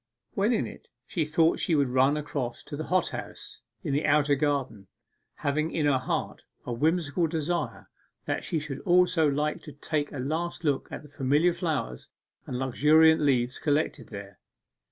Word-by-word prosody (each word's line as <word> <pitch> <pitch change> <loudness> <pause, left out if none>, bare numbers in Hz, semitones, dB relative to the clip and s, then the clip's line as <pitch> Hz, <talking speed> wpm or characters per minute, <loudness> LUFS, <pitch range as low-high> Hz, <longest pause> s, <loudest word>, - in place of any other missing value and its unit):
When 200 +4 +2
in 225 - +1
it, - - -11 0.2
she 160 +3 -1
thought 160 +2 +2
she 165 - +1
would 140 -3 +2
run 130 +3 +3
across 140 -5 -4
to - - -7
the 155 - -4
hot 185 -2 +1
house - - -8 0.2
in 140 - -2
the 145 +3 +1
outer 145 0 +4
garden, 135 -8 -1 0.5
having 155 +3 -1
in 155 -3 -1
her 140 -3 +3
heart - - -3 0.2
a 120 - -3
whimsical 160 +4 +1
desire 160 0 -2 0.4
that - - -2
she 165 - -2
should 145 -3 -4
also 180 -3 +3
like 150 +2 -1
to 150 - -10
take 145 0 -2
a - - -6
last 160 +7 -3
look 145 -4 0
at - - -6
the - - -12
familiar 145 +5 +2
flowers 155 - -3 0.4
and 125 - -3
luxuriant 155 +5 +4
leaves 125 -3 +1
collected 150 +1 0
there. 100 -3 -9
150 Hz, 175 wpm, -27 LUFS, 135-160 Hz, 0.5 s, outer